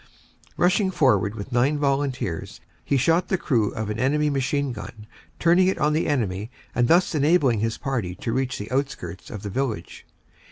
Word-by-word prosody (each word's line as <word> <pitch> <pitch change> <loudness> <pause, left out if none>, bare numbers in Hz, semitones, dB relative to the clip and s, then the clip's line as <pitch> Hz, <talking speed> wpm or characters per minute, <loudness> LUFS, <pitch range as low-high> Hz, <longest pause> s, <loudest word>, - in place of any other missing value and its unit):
Rushing 190 +2 +3
forward 110 - +2
with 105 +4 -7
nine 130 +5 +2
volunteers, 135 - -2 0.2
he 140 - +1
shot 165 +7 +2
the 190 - +1
crew 115 -11 +1
of 110 -1 -3
an 105 - -4
enemy 150 +4 +2
machine 140 0 0
gun, 105 0 -9 0.3
turning 175 +2 +4
it 190 - +1
on 150 0 +2
the 155 - 0
enemy 110 -7 -1 0.2
and 120 -1 +2
thus 175 +5 +4
enabling 145 -6 +3
his 115 +1 -1
party 120 -11 -3
to 115 - -3
reach 130 0 -1
the 105 - -7
outskirts 130 -10 -3
of 105 -1 -7
the 100 - -5
village. 115 -7 -4
130 Hz, 175 wpm, -24 LUFS, 110-150 Hz, 0.3 s, turning